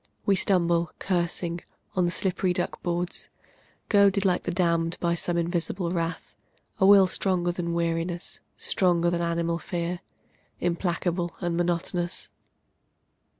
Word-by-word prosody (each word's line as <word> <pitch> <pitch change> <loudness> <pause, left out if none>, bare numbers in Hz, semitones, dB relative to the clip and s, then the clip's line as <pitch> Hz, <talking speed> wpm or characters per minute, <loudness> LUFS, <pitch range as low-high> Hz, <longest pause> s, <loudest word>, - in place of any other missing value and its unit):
We 200 - +4
stumble, 170 -3 +2
cursing, 175 -1 -1 0.3
on 180 -1 +3
the 175 - 0
slippery 185 0 +1
duck 175 - -3
boards. 175 0 -2 0.6
Goaded 200 -1 +4
like 180 -2 +2
the - - -3
damned 170 -1 +1
by 170 -1 +1
some 170 0 -1
invisible 170 +1 -1
wrath, 165 -1 -3 0.4
A 190 - +5
will 200 -1 +8
stronger 180 -1 0
than 170 -1 -3
weariness, 170 +1 -1 0.2
stronger 175 -2 +2
than 170 0 0
animal 170 0 0
fear, 175 0 -3 0.6
Implacable 175 0 -1
and 175 -2 -1
monotonous. 175 0 -1
175 Hz, 125 wpm, -26 LUFS, 170-180 Hz, 0.6 s, will